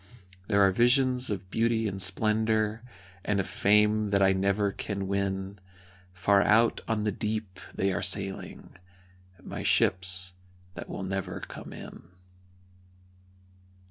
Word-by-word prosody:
There 100 0 +4
are 95 - +4
visions 125 +4 +2
of 95 -2 -5
beauty 115 -1 +1
and 95 -1 -3
splendour, 110 +3 +1 0.4
And 105 -1 0
a - - +1
fame 105 +2 +2
that 100 0 +2
I 95 0 +5
never 100 +1 +1
can 100 -1 -4
win 100 0 -2 0.5
Far 100 +2 +3
out 110 +4 +3
on 110 -2 0
the 105 - 0
deep 105 -2 -4 0.2
they 95 0 0
are - - -2
sailing 95 0 -2 0.7
My - - -6
ships 95 0 +1 0.4
that - - -8
will - - -5
never 95 0 -4
come - - -9
in. - - -11
100 Hz, 130 wpm, -28 LUFS, 95-110 Hz, 0.7 s, I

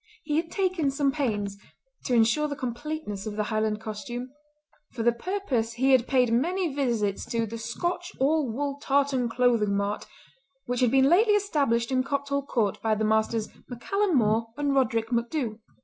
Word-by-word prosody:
He 300 -1 -1
had 330 +1 -1
taken 370 -6 0
some 275 0 +1
pains, 210 -8 -2 0.5
to 250 - +1
insure 235 +7 +3
the 285 - -4
completeness 255 -5 -5
of 210 - -4
the 210 - 0
Highland 215 0 -1
costume. 240 +3 -6 0.6
For 230 - -3
the 240 - +5
purpose 245 - -2
he 260 +3 +2
had 255 -2 +4
paid 250 -3 +3
many 340 +6 0
visits 235 -8 0
to 230 -1 0
"The 230 +1 -7
Scotch 345 +11 -3
All 285 0 +2
Wool 280 +3 -3
Tartan 275 -3 +1
Clothing 230 -4 +2
Mart" 200 +1 -2 0.6
which 245 0 -2
had 250 -2 +4
been 265 +2 +4
lately 415 +7 +5
established 280 - +1
in 255 0 +2
Copthall 280 0 -2
court 215 -5 0
by 220 -1 +1
the 215 +1 0
Messrs. 220 0 +1 0.2
MacCallum 370 - 0
More 225 -1 +2
and 290 -1 0
Roderick 230 -4 +1
MacDhu. 235 -1 -1
250 Hz, 170 wpm, -27 LUFS, 225-285 Hz, 0.6 s, the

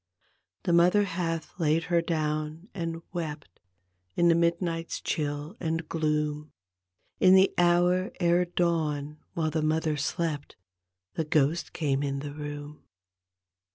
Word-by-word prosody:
The 175 - +1
mother 180 +4 +5
hath 170 -2 -3
laid 160 0 +2
her 170 0 +2
down 155 +2 -2
and 165 -3 -4
wept 150 - -5 0.6
In 175 0 +4
the - - +6
midnight's 170 0 0
chill 145 +3 -3
and 165 -1 -2
gloom; 150 -1 -1 0.7
In 185 0 +7
the 190 0 +5
hour 175 +1 +3
ere 175 0 +3
dawn 155 -4 -1 0.2
while 160 -2 0
the 160 +1 0
mother 155 0 +1
slept 150 0 -2 0.6
The 160 - -2
^ost 155 +1 +1
came 140 -4 0
in 140 -1 -1
the 145 +1 -5
room. 145 0 -7
165 Hz, 125 wpm, -28 LUFS, 150-170 Hz, 0.7 s, In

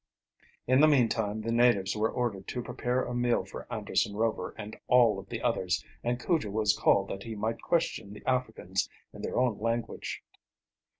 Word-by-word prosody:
In 130 +2 +4
the 155 - +8
meantime 115 -6 +2
the 115 +1 -2
natives 115 -5 +3
were 110 +1 +1
ordered 110 -6 -2
to 125 - -3
prepare 125 +2 -1
a 125 - -4
meal 120 -1 +1
for - - -9
Anderson 100 - 0
Rover 110 +1 -1
and 105 0 -7
all 120 -3 +5
of - - -12
the - - -5
others, - - 0 0.2
and 120 +1 0
Cujo 150 -4 0
was 105 0 +2
called 100 0 +3
that 95 - -5
he 110 +1 -6
might 110 +2 -2
question 160 -11 0
the 105 - -11
Africans 110 -7 -1 0.2
in - - -9
their - - -3
own 125 -4 +2
language. 115 +2 -3
115 Hz, 180 wpm, -29 LUFS, 105-125 Hz, 0.2 s, the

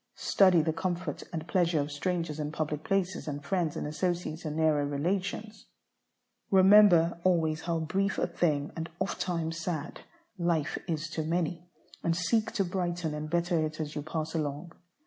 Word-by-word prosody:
Study 185 -5 +4
the 160 0 0
comfort 175 -3 -3
and 160 -1 -5
pleasure 170 -4 +2
of 145 +1 -2
strangers 165 0 -2
in 150 0 -2
public 155 -1 -3
places, 195 -3 -1
and 145 -1 -5
friends 175 -3 0
and - - -3
associates 165 +1 -2
in 150 -1 -3
nearer 155 -2 +3
relations. 185 +9 -2 0.8
Remember 190 -4 +6
always 160 -4 +2
how 165 -2 -1
brief 195 +5 0
a - - +2
thing, 155 -4 0
and 165 0 -4
ofttimes 170 -4 -2
sad, 165 -2 -4 0.4
life 170 -4 0
is 160 0 -2
to 160 - -2
many, 170 +1 -2 0.3
and 165 0 +1
seek 215 +5 +1
to 210 -4 +1
brighten 175 -3 -2
and 150 0 -4
better 175 -1 +1
it 155 0 -4
as 150 -1 -3
you 150 - -3
pass 155 +1 -4
along. 155 +1 -3
165 Hz, 165 wpm, -29 LUFS, 155-180 Hz, 0.8 s, Remember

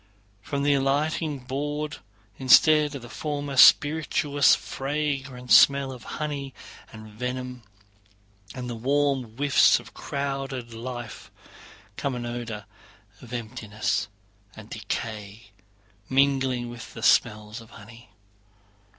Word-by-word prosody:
From 140 +8 -3
the 145 0 +3
alighting 145 +3 0
board, 145 +3 -4 0.4
instead 150 +3 +5
of 130 - -7
the - - -9
former 145 +1 -4
spirituous 145 0 +5
fragrant 135 -3 -4
smell 140 -1 +6
of 125 -3 -10
honey 145 -3 -4 0.4
and 110 0 -11
venom, 125 +3 -5 0.9
and 125 -1 -5
the 120 - -4
warm 135 -1 0
whiffs 140 -1 +5
of - - -14
crowded 135 -4 -4
life, 120 -2 -7 0.7
comes 140 -2 -2
an 120 -1 -5
odor 120 -3 -5 0.6
of 125 - -13
emptiness 110 -4 -3 0.5
and 110 0 -13
decay 105 -1 -6 0.6
mingling 130 -2 +2
with 120 -1 -10
the - - -8
smell 105 0 +3
of 115 -1 -14
honey. 115 +1 -14
130 Hz, 110 wpm, -25 LUFS, 115-140 Hz, 0.9 s, smell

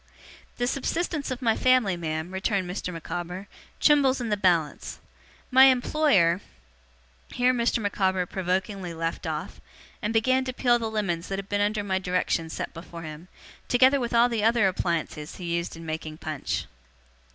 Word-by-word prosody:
'The 245 - 0
subsistence 300 +3 -2
of 255 0 -4
my 225 -2 +3
family, 255 -7 +3
ma'am,' 160 +1 -4
returned 190 0 -1
Mr. 180 0 -4
Micawber, 175 +3 -6 0.3
'trembles 275 -3 +4
in 240 -2 -3
the 210 - +2
balance. 175 -6 0 0.5
My 260 +1 +8
employer 245 - +3 0.4
' 60 0 -34
Here 250 +1 +3
Mr. 235 -1 +1
Micawber 190 -4 0
provokingly 185 0 -2
left 165 0 -3
off; - - -5 0.4
and 210 - -1
began 255 +4 +2
to 255 - -3
peel 240 -1 +3
the 225 -1 -2
lemons 190 -6 -2
that 195 - -3
had 195 0 -6
been 205 0 0
under 205 0 0
my 190 -2 0
directions 180 -3 -1
set - - -4
before 170 0 -9
him, 155 +2 -9 0.4
together 260 +3 +5
with 240 -2 -2
all 235 +1 +5
the 230 -3 -1
other 225 -2 +4
appliances 170 -4 -2
he 170 -2 -3
used 170 0 -3
in 165 0 -10
making 155 -1 -5
punch. 155 -3 -3
195 Hz, 165 wpm, -26 LUFS, 170-240 Hz, 0.5 s, My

